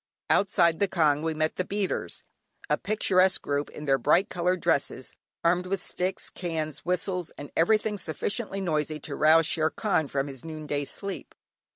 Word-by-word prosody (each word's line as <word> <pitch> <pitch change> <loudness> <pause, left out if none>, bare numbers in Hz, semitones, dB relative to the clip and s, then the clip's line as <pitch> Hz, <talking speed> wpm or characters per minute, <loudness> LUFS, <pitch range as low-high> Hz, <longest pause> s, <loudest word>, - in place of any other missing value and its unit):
Outside 170 -4 +3
the 200 - +3
kyaung 155 -5 +2
we 160 0 -1
met 155 0 -1
the 185 - +1
beaters; 200 +1 -3 0.5
a - - +6
picturesque 190 -3 +2
group 145 0 -1
in 150 - -9
their 135 -1 +3
bright 170 - +3
coloured 180 +1 0
dresses, 140 -6 -1 0.3
armed 180 +2 +2
with 195 +1 -1
sticks, 185 0 -2
cans, 160 -4 -3
whistles, 180 -1 -2
and 145 - -8
everything 210 +4 +2
sufficiently 195 +5 -2
noisy 155 -3 -1
to 145 0 -5
rouse 160 +2 +5
"Shere 155 0 +1
Khan" 175 -8 0
from 135 0 -1
his 135 -3 -9
noonday 150 -3 -4
sleep. 195 +6 -6
165 Hz, 165 wpm, -27 LUFS, 150-185 Hz, 0.5 s, a